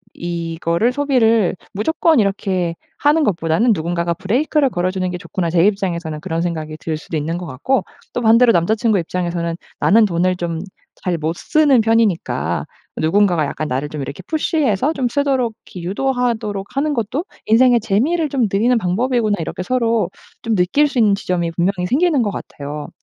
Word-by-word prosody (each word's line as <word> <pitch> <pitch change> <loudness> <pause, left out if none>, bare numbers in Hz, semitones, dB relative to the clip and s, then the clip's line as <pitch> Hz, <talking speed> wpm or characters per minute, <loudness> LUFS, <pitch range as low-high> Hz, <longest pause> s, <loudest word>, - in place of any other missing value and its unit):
이거를 170 +4 -1
소비를 235 -8 +2 0.2
무조건 315 - +2
이렇게 190 -4 0 0.2
하는 300 +2 +3
것보다는 190 - +2
누군가가 170 0 -1
브레이크를 270 - +1
걸어주는 185 -2 -1
게 180 - -4
좋구나.' 175 -2 -3
제 170 +1 +3
입장에서는 175 -6 -1
그런 165 -1 -2
생각이 155 -3 -4
들 160 -1 -3
수도 155 +1 -5
있는 160 +3 -2
것 180 - -7
같고 200 - 0 0.3
또 245 - -2
반대로 230 +1 +5
남자 175 +5 +2
친구 215 -3 +1
입장에서는 170 -1 -2 0.2
'나는 220 +2 +5
돈을 185 -1 +1
좀 170 -2 -3 0.4
잘 180 -2 0
못 160 +1 -2
쓰는 290 - +3
편이니까 225 -5 +1 0.3
누군가가 175 -1 +2
약간 155 +2 -4
나를 135 +3 -2
좀 150 -1 -5
이렇게 140 - -7
푸시해서 300 - +1
좀 265 -5 -1
쓰도록 265 -4 0
이렇게 180 - -9
유도하도록 225 -4 -1
하는 295 +2 +1
것도 260 - -2 0.2
인생의 240 +2 +5
재미를 290 - +1
좀 260 -4 +1
늘리는 235 +5 +3
방법이구나.' 215 +2 0
이렇게 165 +3 -4
서로 230 -4 +1 0.3
좀 225 -1 0
느낄 200 +12 +3
수 265 -3 -2
있는 210 -3 +4
지점이 175 -4 -2
분명히 180 +2 0
생기는 300 - +2
것 215 - 0
같아요. 145 -4 -7
200 Hz, 395 characters per minute, -19 LUFS, 170-245 Hz, 0.4 s, 반대로